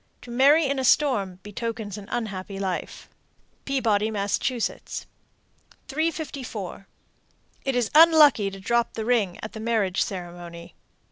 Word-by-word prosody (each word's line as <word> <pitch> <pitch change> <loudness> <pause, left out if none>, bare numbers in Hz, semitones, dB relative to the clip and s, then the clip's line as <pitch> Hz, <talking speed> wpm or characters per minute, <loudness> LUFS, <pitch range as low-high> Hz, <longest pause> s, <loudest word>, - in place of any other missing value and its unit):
To 245 - -10
marry 285 +6 +5
in 275 0 0
a - - -1
storm 235 -9 +2
betokens 215 -1 -5
an 205 -2 -9
unhappy 200 -4 -4
life. 190 -2 -4 0.6
Peabody, 225 -6 +1
Mass. 200 -2 -1
354. 265 - -5 0.8
It 270 -1 -1
is 245 -3 0
unlucky 305 -9 +7
to 195 0 -10
drop 235 +4 0
the 220 - -3
ring 220 -7 +1
at 215 - -6
the 220 - -7
marriage 220 -5 0
ceremony. 175 -2 -6
220 Hz, 125 wpm, -25 LUFS, 195-265 Hz, 0.8 s, unlucky